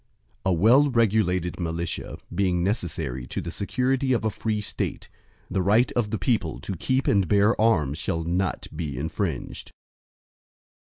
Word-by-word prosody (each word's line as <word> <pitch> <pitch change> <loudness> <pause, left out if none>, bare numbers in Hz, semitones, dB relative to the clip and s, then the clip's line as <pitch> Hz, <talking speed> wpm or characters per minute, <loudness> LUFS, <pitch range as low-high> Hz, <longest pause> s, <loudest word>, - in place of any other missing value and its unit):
II - - +4
A - - +3
well 120 - +5
regulated 100 -8 +1
militia, 85 0 -3 0.2
being 90 -3 +1
necessary 80 - -2
to - - -4
the - - -5
security 130 +5 0
of 115 -2 0
a 110 - +1
free 110 +1 -2
State, 105 - -4 0.4
the 95 - -1
right 105 +6 +3
of 120 -4 0
the 110 - -1
people 115 +4 0
to 95 - -4
keep 130 +9 0
and 100 -3 +3
bear 105 +4 +3
arms, 75 -10 +2
shall 80 0 -2
not 90 +2 -1
be 75 -4 -4
infringed. 80 -1 -3
100 Hz, 155 wpm, -25 LUFS, 85-115 Hz, 0.4 s, well